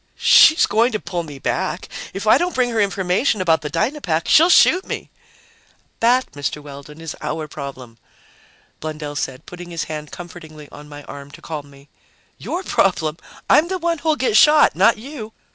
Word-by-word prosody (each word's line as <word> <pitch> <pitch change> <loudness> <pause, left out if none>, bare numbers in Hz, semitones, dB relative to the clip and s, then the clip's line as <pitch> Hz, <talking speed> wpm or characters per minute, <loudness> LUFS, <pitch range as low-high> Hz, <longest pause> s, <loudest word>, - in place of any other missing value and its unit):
"She's 310 - +6
going 230 +4 +2
to 215 - -1
pull 175 -4 -4
me 150 -4 -9
back! - - -3 0.2
If 195 +3 -6
I 215 - +5
don't 355 +1 -2
bring 250 -1 +1
her 230 - -3
the 210 - +4
information 195 +4 0
about 165 -3 +2
the 150 - -5
Dynapack, 170 - -1
she'll 330 +3 +6
shoot 365 +1 +5
me!" - - -7 0.9
"That, 245 +3 +2
Mr. 145 +1 -4
Weldon, 145 +1 -12
is 165 -1 -7
our 155 -1 -4
problem," 130 -5 -9 0.8
Blundell 150 -1 -6
said, 130 -2 -4
putting 175 0 -10
his 170 -2 -4
hand 150 -1 -7
comfortingly 160 -4 -11
on 150 0 -12
my 145 0 -10
arm 140 0 -10
to 140 - -14
calm 150 -3 -7
me. 140 0 -18 0.5
"Your 365 - -4
problem? 165 - 0 0.3
I'm 315 - +4
the 375 +1 -2
one 335 -2 -1
who'll 315 0 +1
get 255 -7 -1
shot, 300 +6 +6
not 230 - +4
you!" 225 -2 -9
170 Hz, 180 wpm, -20 LUFS, 150-240 Hz, 0.9 s, She's